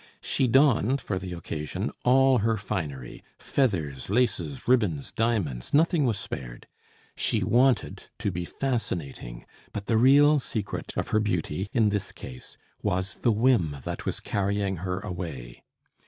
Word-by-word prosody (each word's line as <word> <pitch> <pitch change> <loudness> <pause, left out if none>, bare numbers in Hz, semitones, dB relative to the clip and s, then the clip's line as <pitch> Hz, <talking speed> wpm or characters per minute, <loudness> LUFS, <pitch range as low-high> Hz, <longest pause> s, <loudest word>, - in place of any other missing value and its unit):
She 130 - +1
donned 135 0 +4
for 95 -7 -3
the 90 -1 -6
occasion 75 -3 -4
all 130 0 +5
her 110 +1 +1
finery; 75 - -5
feathers, 80 - -1
laces, 125 +4 0
ribbons, 105 - +2
diamonds, 105 - -1
nothing 160 -2 +3
was 110 -4 0
spared. - - -7 0.5
She - - 0
wanted 125 +2 +2
to 100 - -1
be 90 0 -3
fascinating; 85 - -4 0.3
but 100 -1 -5
the 115 - +2
real 145 +4 +6
secret 110 -5 -4
of - - -2
her 110 - +3
beauty, 95 -2 -2
in 115 -4 +3
this 100 -1 -2
case, 65 -1 -10 0.2
was 95 +4 -1
the 120 - +2
whim 105 - +2
that - - -5
was - - -1
carrying 100 -1 -1
her 90 +2 -3
away. 80 -11 -6
105 Hz, 140 wpm, -27 LUFS, 85-125 Hz, 0.5 s, real